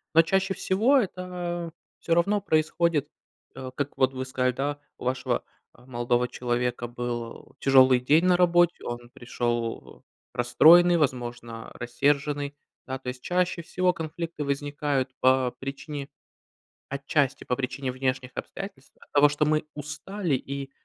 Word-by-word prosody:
Но 165 - +8
чаще 195 +2 +1
всего- 225 +9 +3
это 180 -5 -3 0.3
всё 165 - +1
равно 200 +4 +2
происходит, 155 0 +1 0.5
э, 130 -1 -6
как 145 0 -3
вот 130 0 +3
вы 130 0 -3
сказали, 125 -1 0
да, 145 +3 -2 0.2
у - - -9
вашего, 130 0 -1 0.3
а, 120 - -19
молодого 120 0 0
человека 120 0 -2
был 120 0 -6
тяжелый 130 -2 +6
день 155 +7 +3
на 180 -1 +5
работе, 175 -1 +3
он 120 0 -6
пришел 120 -1 -3 0.3
расстроенный, 170 +8 +6
возможно, 120 -5 -3
рассерженный. 145 +3 0 0.3
Да, 130 0 -4
то 130 - -13
есть, 125 0 -7
чаще 180 -1 0
всего 180 +2 +1
конфликты 165 -1 -5
возникают 140 -1 -1
по 130 -1 +4
причине, 140 +1 -6 0.8
отчасти, 140 0 0
по 125 - -1
причине 135 0 -3
внешних 130 0 -2
обстоятельств, 195 -9 -7
от - - -19
того, 145 0 +6
что 145 +1 0
мы 155 0 +2
устали 155 +3 -3
и, 140 +1 -6
140 Hz, 140 wpm, -26 LUFS, 125-165 Hz, 0.8 s, Но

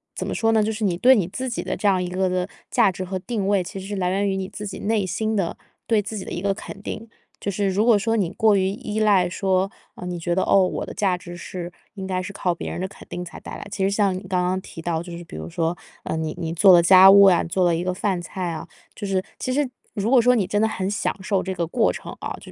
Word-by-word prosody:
怎 - - -3
么 - - -3
说 225 0 +1
呢？ 220 - +4
就 220 - 0
是 220 0 -2
你 180 -3 +1
对 250 +9 +6
你 185 -6 +1
自 255 +7 -4
己 235 - -3
的 - - -3
这 - - -7
样 190 -2 +4
一 180 - -2
个 185 +1 0
的 180 0 -1 0.2
价 - - +4
值 185 - -5
和 185 +1 -4
定 210 0 -3
位， 200 -1 +2
其 180 +2 -7
实 190 - -8
是 205 - -4
来 180 -1 0
源 200 +2 +1
于 195 - -1
你 190 -1 -3
自 210 +2 -7
己 200 - -6
内 210 -1 0
心 220 +4 -1
的， 190 -5 -1 0.3
对 220 -3 +2
自 210 +2 -6
己 190 - -5
的 - - -8
一 175 - -3
个 195 0 +1
肯 195 - -9
定。 220 +2 -6 0.3
就 200 - -3
是 200 +1 0
如 200 +4 +1
果 230 -4 +5
说 225 +2 0
你 190 -5 0
过 220 -1 +3
于 190 -1 +2
依 210 +1 -4
赖 195 -4 +4
说， 190 +1 0 0.3
哦， - - -8
你 180 -1 -4
觉 170 +1 -1
得， 190 - +1
哦， 195 -2 +4
我 - - -3
的 - - -8
价 190 -3 +1
值 175 -1 -10
是 175 0 -7 0.2
应 190 -1 -5
该 185 -1 -1
是 205 - -6
靠 180 -3 -1
别 - - -5
人 - - -5
的 190 - -2
肯 195 - -14
定 180 0 -5
才 175 - -10
带 - - -9
来， - - -8
其 195 -1 -3
实 195 - +2
像 200 -2 +2
你 185 - -7
刚 180 -1 0
刚 185 +1 0
提 165 - -10
到 165 -1 -2
就 175 -1 -8
是 175 - -8
比 - - -11
如 80 +1 -6
说， 165 - -1 0.3
呃， - - -2
你 160 -1 -2
你 165 -1 -3
做 185 +3 +7
了 175 - +8
家 190 +2 +8
务 200 0 +8
啊， 185 -3 +6
做 180 +2 0
了 170 -1 +3
一 170 - -2
个 185 - -1
饭 190 -1 -1
菜 175 0 -4
啊、 155 - -6 0.3
就 210 - -6
是 190 -1 0 0.2
其 255 - -3
实 285 -1 +1 0.2
如 215 0 -1
果 255 -2 +6
说 250 +2 +5
你 205 -6 +1
真 205 +2 0
的 220 - +4
很 190 -3 -2
享 205 - -1
受 195 -1 0
这 190 - -3
个 170 -2 -2
过 225 +7 +2
程 - - -8
啊， - - -4
就 - - -15
190 Hz, 325 characters per minute, -23 LUFS, 180-205 Hz, 0.3 s, 了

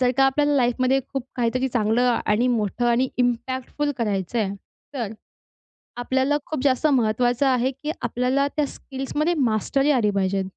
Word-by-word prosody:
जर 250 -1 +3
का 270 - +5
आपल्याला 290 +2 +2
लाईफमध्ये 255 +1 +2
खूप 270 -2 -3
काहीतरी 255 +2 0
चांगलं 240 +1 +2
आणि 220 +4 +2
मोठं 230 0 0
आणि 240 +2 +2
इम्पॅक्टफुल 255 +4 -1
करायचं 210 -1 -1
आहे 205 -3 0 0.4
तर 230 -6 -3 0.9
आपल्याला 265 +4 +1
खूप 305 -4 -4
जास्त 275 +2 +2
महत्वाचं 245 0 +2
आहे, 255 0 +2
की 295 +4 -5
आपल्याला 250 +3 0
त्या 300 -2 +1
स्किल्समध्ये 290 +5 -3
मास्टरी 270 +3 +1
आली 240 -7 +2
पाहिजे 195 0 +1
250 Hz, 150 wpm, -23 LUFS, 235-270 Hz, 0.9 s, का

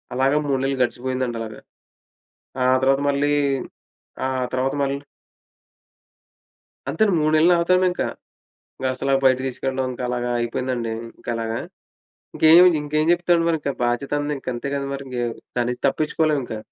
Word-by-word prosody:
అలాగా 135 +3 +2
3 135 -2 +1
నెలలు 135 0 0
గడిచిపోయిందండలాగ. 120 -3 -3 1.1
ఆ - - +2 0.2
తర్వాత 135 +1 +3
మళ్ళీ 145 +1 +1 0.9
ఆ - - +1 0.3
తర్వాత 130 +1 0
మళ్ళీ 140 0 0 1.9
అంతేండి 190 +8 +2
3 155 0 +2
నెల్లు 165 +3 +5
నాతోనింకా. 180 +1 +2 0.7
క్లాసులాపి 135 +1 0
బయటికి 130 0 +3
తీసుకెళ్ళడం 130 +1 -2
ఇంకలాగా 125 -1 -3
అయిపోయిందండి 120 0 -2 0.3
ఇంకలాగా. 115 -1 -3 0.8
ఇంకేం 165 +3 +7 0.2
ఇంకేం 155 +1 0
చెప్తాడు 175 -1 +2
మరింక? 160 -4 0
బాధ్యతంది 145 +5 -1
ఇంకంతే 130 -1 -5
గదండీ! 140 0 -3
మరింగేవ్ 125 -4 -4 0.2
దాన్నించి 125 0 -1
తప్పిచ్చుకోలేవింకా. 150 -6 0
135 Hz, 110 wpm, -22 LUFS, 125-150 Hz, 1.9 s, ఇంకేం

